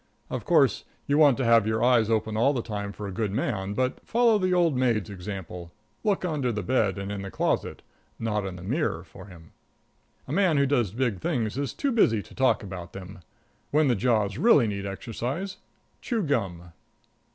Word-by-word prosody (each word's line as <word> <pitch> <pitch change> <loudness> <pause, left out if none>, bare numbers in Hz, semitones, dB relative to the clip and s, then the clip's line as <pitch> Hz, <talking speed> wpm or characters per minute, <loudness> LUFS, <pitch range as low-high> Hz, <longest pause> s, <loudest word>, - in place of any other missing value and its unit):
Of - - -4
course, - - +3 0.2
you 145 +1 +2
want 145 -5 +6
to 130 - -1
have 115 -2 +5
your 110 +1 0
eyes 120 -3 +4
open 110 -1 0
all 125 +6 +3
the 120 -4 -2
time 100 -2 -4
for 105 0 -7
a - - -5
good 105 +1 -2
man, 100 -2 -2
but 130 +2 -1
follow 230 -2 +3
the 185 -1 +1
old 175 -5 +3
maid's 115 -5 +1
example 90 -3 -7 0.3
look 200 -3 +1
under 145 -7 -1
the 105 -2 -3
bed 110 -6 +1
and 100 +1 -4
in 100 -1 -4
the 100 - -6
closet, - - -1 0.3
not 105 -2 -1
in 95 -2 -5
the 90 - -10
mirror, 110 - -1
for 95 - -13
him. 85 -4 -14 0.8
A - - -6
man 175 -4 +3
who 140 - +4
does 125 -7 +1
big 115 -2 -1
things 115 - -1
is 140 -2 -2
too 280 - -1
busy 115 - +3
to - - -16
talk 130 -4 +2
about 90 -3 -8
them. 95 0 -9 0.5
When 150 -1 +3
the 120 - +3
jaws 105 -3 +1
really 200 - +5
need 100 -2 -3
exercise, 125 - -4 0.4
chew 230 -5 -1
gum. 95 - -2
115 Hz, 195 wpm, -26 LUFS, 100-140 Hz, 0.8 s, want